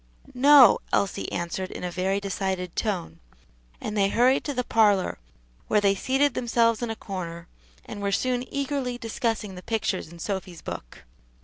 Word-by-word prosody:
"No," 270 -2 +7
Elsie 200 - 0
answered 175 +2 -3
in - - -8
a 180 - -3
very 190 +2 0
decided 190 -2 -3
tone; 180 - -2 0.6
and 210 - -5
they 195 -1 +3
hurried 250 +5 +3
to 285 - -2
the 250 - 0
parlor, 205 - +2 0.5
where 210 - +3
they 200 -1 +3
seated 270 +8 +1
themselves 230 -2 +1
in 240 - -2
a 225 - -3
corner, 170 -5 -6 0.4
and 205 - -7
were 200 0 -1
soon 250 +3 0
eagerly 275 -3 -2
discussing 225 -3 -2
the 180 - -9
pictures 220 -4 -2
in 170 - -12
Sophy's 185 -1 -5
book. - - -8
205 Hz, 165 wpm, -26 LUFS, 185-245 Hz, 0.6 s, No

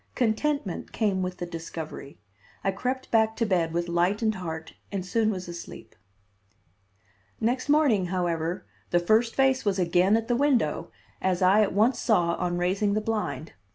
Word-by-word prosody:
Contentment 245 - -1
came 200 -4 0
with 185 0 -3
the 175 - -4
discovery. 165 -4 -7 0.5
I 195 - +2
crept 255 +7 -3
back 220 -1 +3
to 230 - 0
bed 175 -5 +1
with 170 +1 -1
lightened 190 +6 +1
heart 160 -4 -6 0.2
and 195 -2 -3
soon 220 +3 +1
was 185 -4 -4
asleep. 170 0 -9 1.4
Next 245 +5 -1
morning, 275 -11 +3
however, 175 0 -2 0.2
the 175 - +3
first 220 +6 +2
face 265 -1 +3
was 200 -2 0
again 180 +3 +3
at 225 0 -3
the 240 - +1
window, 275 -1 +1 0.3
as 185 0 +1
I 195 +4 +5
at 210 - +1
once 225 +5 +3
saw 175 -7 +2
on 175 0 -1
raising 195 +3 +1
the - - +2
blind. 215 -7 -3
195 Hz, 160 wpm, -26 LUFS, 175-225 Hz, 1.4 s, I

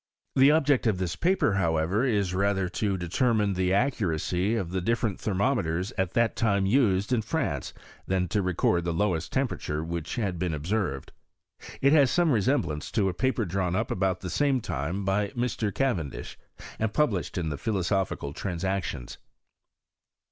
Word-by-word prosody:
The 135 +1 +6
object 145 -5 +3
of 105 -4 +2
this 90 -2 -2
paper, 180 - +2
however, 85 +3 +1
is 100 -8 +1
rather 95 0 +1
to 100 +1 -1
determine 105 +4 +1
the 90 0 0
accuracy 100 - 0
of 95 -7 -2
the 95 0 -1
different 115 0 0
thermometers 95 -4 0
at 95 -1 -1
that 115 -1 +2
time 100 -5 +1
used 105 -1 +2
in 120 - +2
France, 110 - -2 0.4
than 95 -1 +1
to 105 - +1
record 90 -1 +1
the 85 -1 -2
lowest 85 -3 0
temperature 115 - -2
which 85 -1 -4
had 100 -7 -2
been 85 -3 -1
observed. 80 -3 -2 0.7
It 140 +2 +5
has 140 -4 +6
some 175 +1 +2
resemblance 115 - 0
to 100 -4 +2
a - - -3
paper 130 +3 0
drawn 90 0 -1
up 110 +3 -1
about 95 -1 0
the 90 - -5
same 140 -3 +2
time 90 - -3
by 100 +2 +1
Mr. 120 -3 -1
Ca 135 +5 +1
irendish, 70 -9 -6 0.4
and 110 -1 0
published 110 - 0
in 85 -3 -1
the 75 - -3
Philosophical 95 -7 -1
Trans 90 +1 -4
ictions. 95 -10 -3
95 Hz, 165 wpm, -27 LUFS, 90-115 Hz, 0.7 s, The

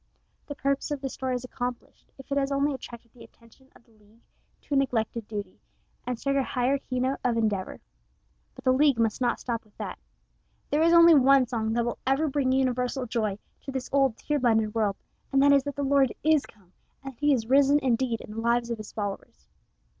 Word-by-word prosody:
The 285 - -6
purpose 275 +1 -1
of 290 -1 -3
this 270 -1 -5
story 260 -1 -2
is 250 - -4
accomplished 245 -1 -7
if 270 +1 -14
it 280 - +1
has 275 0 -1
only 280 +1 +1
attracted 235 -3 -10
the 245 - -14
attention 235 +3 -21
of - - -20
the 230 - -28
League 215 +1 -26 0.4
to - - -7
a - - +3
neglected 230 -4 -1
duty, 205 -3 -6 0.5
and 250 -1 -2
struck 275 +3 -1
a - - +3
higher 260 +2 0
key 255 -1 -4
note 260 +2 -1
of 240 -2 +1
endeavor. 210 -4 -1 0.8
But - - -13
the 255 - +3
League 280 -1 +3
must 225 +1 0
not 245 -1 +1
stop 235 -2 -4
with 215 -2 -29
that. - - -6 0.7
There 295 - +2
is 335 +1 +4
only 335 0 +8
one 275 -2 +5
song 225 -2 -2
that 235 0 0
will 240 - -3
ever 275 +4 +2
bring 275 -2 0
universal 255 0 0
joy 220 -4 -2 0.2
to 275 - -7
this 265 -1 -5
old, 270 -4 +2
tear 295 -1 -1
blinded 220 -4 +2
world, 215 -3 0 0.4
and 270 - +3
that 285 0 +6
is 275 -1 +3
that 285 -2 -4
the 285 - -2
Lord 275 -2 +3
is 310 -1 +3
come, 190 -3 -22 0.3
and 270 0 -7
that 235 - -31
he 295 0 +3
is 245 -5 +1
risen 275 +3 +4
indeed 250 -4 0
in - - -11
the 225 +1 -5
lives 235 +1 +1
of 230 - -3
his 215 - -9
followers. 200 - -6
255 Hz, 220 wpm, -27 LUFS, 230-275 Hz, 0.8 s, only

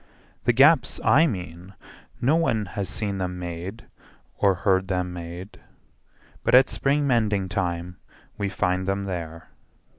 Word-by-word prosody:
The - - +5
gaps 135 +2 +4
I 140 +9 +5
mean, 90 - -6 0.4
No 130 +6 +3
one 115 -11 +1
has 100 -3 -3
seen 100 -1 -3
them 90 -1 -3
made 90 +5 -6 0.5
or 100 -2 +3
heard 95 0 +1
them 90 -1 -2
made, 85 +3 -8 0.8
But - - +4
at 130 0 +6
spring 145 +1 +1
mending 105 -7 +1
time 90 -1 -3 0.4
we 100 -1 -2
find 95 -1 -1
them 100 0 -1
there. 85 -4 -6
95 Hz, 140 wpm, -24 LUFS, 90-115 Hz, 0.8 s, at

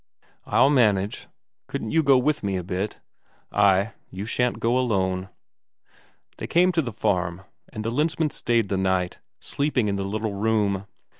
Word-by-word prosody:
"I'll 140 - +4
manage. 105 -7 +2 0.4
Couldn't 110 - -4
you 160 - +4
go 140 -3 +5
with 145 +4 +1
me 100 -2 -1
a 90 - -4
bit?" 95 +4 -3 0.5
"Ay; 100 +1 +3 0.2
you 95 +2 -6
shan't 125 +2 0
go 115 +2 +1
alone." 95 -6 0 1.1
They - - -5
came 180 +2 +4
to 165 -2 +1
the 125 -5 -4
farm, 90 -4 -1 0.3
and 110 - -5
the 115 - -1
Lensmand 155 +3 0
stayed 115 -4 0
the 95 - 0
night, 95 -1 0 0.2
sleeping 140 -6 -1
in 100 -1 -1
the 100 - -2
little 105 +2 -3
room. 100 -2 0
105 Hz, 160 wpm, -24 LUFS, 95-125 Hz, 1.1 s, go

